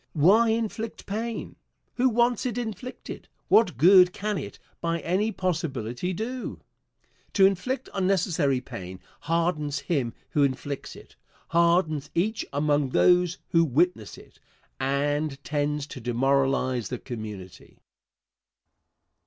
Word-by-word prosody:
Why 200 Hz, +9 st, +5 dB
inflict 225 Hz, 0 st, -3 dB
pain? 225 Hz, +3 st, -4 dB, 0.4 s
Who 255 Hz, +1 st, +4 dB
wants 240 Hz, +1 st, +2 dB
it 240 Hz, -1 st, -4 dB
inflicted? 235 Hz, +1 st, -6 dB, 0.2 s
What 225 Hz, -, +4 dB
good 180 Hz, +4 st, +7 dB
can 210 Hz, -1 st, -2 dB
it, -, -, -8 dB, 0.2 s
by 170 Hz, 0 st, -1 dB
any 195 Hz, +6 st, 0 dB
possibility, 160 Hz, -, -2 dB
do? 235 Hz, +7 st, -4 dB, 0.7 s
To 195 Hz, -, +6 dB
inflict 250 Hz, +8 st, 0 dB
unnecessary 170 Hz, -8 st, +1 dB
pain 95 Hz, -6 st, -8 dB, 0.2 s
hardens 160 Hz, -3 st, 0 dB
him 130 Hz, -9 st, -1 dB, 0.2 s
who 150 Hz, -, +1 dB
inflicts 140 Hz, 0 st, -2 dB
it, -, -, -15 dB, 0.3 s
hardens 170 Hz, -3 st, +2 dB
each 215 Hz, +6 st, 0 dB
among 145 Hz, -1 st, +1 dB
those 180 Hz, +4 st, +3 dB
who 165 Hz, 0 st, +4 dB
witness 155 Hz, -, 0 dB
it, -, -, -17 dB, 0.4 s
and 145 Hz, +2 st, 0 dB
tends 145 Hz, 0 st, -1 dB
to 145 Hz, -, -9 dB
demoralize 130 Hz, 0 st, +1 dB
the 125 Hz, -, -3 dB
community. 105 Hz, -7 st, -9 dB
165 Hz, 115 wpm, -26 LUFS, 135-195 Hz, 0.7 s, good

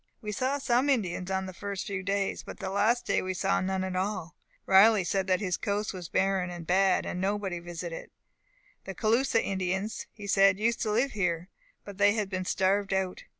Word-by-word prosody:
"We 210 Hz, -, -5 dB
saw 260 Hz, +6 st, 0 dB
some 260 Hz, 0 st, +1 dB
Indians 185 Hz, -8 st, 0 dB
on 190 Hz, 0 st, -1 dB
the 185 Hz, -, -7 dB
first 200 Hz, 0 st, -5 dB
few 195 Hz, -2 st, -3 dB
days, 195 Hz, +1 st, -1 dB
but -, -, -10 dB
the 190 Hz, -1 st, -5 dB
last 215 Hz, +5 st, +2 dB
day -, -, +1 dB
we 185 Hz, 0 st, -3 dB
saw 195 Hz, +2 st, +1 dB
none 190 Hz, 0 st, -1 dB
at 185 Hz, -1 st, -3 dB
all. 185 Hz, -3 st, -3 dB, 0.3 s
Riley 200 Hz, +1 st, +6 dB
said 190 Hz, +2 st, -1 dB
that 185 Hz, +1 st, +2 dB
this 185 Hz, -3 st, -1 dB
coast 205 Hz, 0 st, -2 dB
was 180 Hz, -3 st, -7 dB
barren 190 Hz, -2 st, +1 dB
and 175 Hz, -2 st, -7 dB
bad; 190 Hz, +2 st, +3 dB
nobody 190 Hz, -1 st, -2 dB
visited 170 Hz, -1 st, -6 dB
it. -, -, -28 dB, 0.7 s
The 195 Hz, -, -6 dB
Caloosa 230 Hz, +4 st, +2 dB
Indians, 190 Hz, +2 st, -2 dB
he 205 Hz, -2 st, -10 dB
said, 195 Hz, -1 st, +4 dB
used 230 Hz, +3 st, 0 dB
to 215 Hz, -, 0 dB
live 245 Hz, +6 st, +1 dB
here, 180 Hz, -3 st, -1 dB, 0.4 s
but 200 Hz, -1 st, -10 dB
they 205 Hz, 0 st, +5 dB
had 210 Hz, -3 st, -2 dB
been 185 Hz, 0 st, -2 dB
starved 195 Hz, +2 st, +1 dB
out. 190 Hz, -1 st, -2 dB
195 Hz, 200 wpm, -29 LUFS, 185-210 Hz, 0.7 s, Riley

